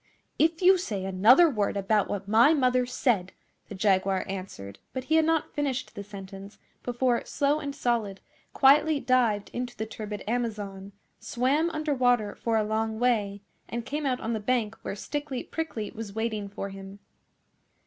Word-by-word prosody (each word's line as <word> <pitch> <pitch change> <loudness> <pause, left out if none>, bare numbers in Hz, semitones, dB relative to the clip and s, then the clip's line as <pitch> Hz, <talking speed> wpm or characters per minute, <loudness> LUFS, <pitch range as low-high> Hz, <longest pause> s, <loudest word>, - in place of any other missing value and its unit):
'If 325 +3 +2
you 375 +1 +6
say 205 - -3
another 215 - +6
word 210 -8 -1
about 200 +1 +1
what 200 -1 -4
my 235 +9 +5
mother 255 -3 +2
said 220 -7 0 0.2
' - - -41
the 205 - -7
Jaguar 190 -1 +1
answered, 185 - -7
but 260 - -3
he 315 +5 +1
had 320 - +4
not 325 -1 0
finished 270 -3 -2
the 200 -3 -7
sentence 195 0 -10 0.2
before 245 0 0
Slow 290 +1 +1
and 280 -2 -5
Solid 225 -7 -1 0.3
quietly 290 +2 +5
dived 235 -6 +1
into 245 0 -4
the 220 - -2
turbid 210 -1 -7
Amazon, 205 -4 -3 0.3
swam 280 +7 +1
under 310 -2 -2
water 245 -5 +2
for 230 -1 -1
a 215 - +2
long 220 +1 -1
way, 210 -5 +1 0.3
and 235 0 -4
came 290 +2 -2
out 255 -1 0
on 225 +1 -3
the 220 - -1
bank 225 -1 0
where - - -5
Stickly 285 +3 -4
Prickly 320 -10 -4
was 220 -3 -7
waiting 220 -2 -2
for 200 0 -5
him. 195 0 -10
230 Hz, 170 wpm, -27 LUFS, 200-265 Hz, 0.3 s, you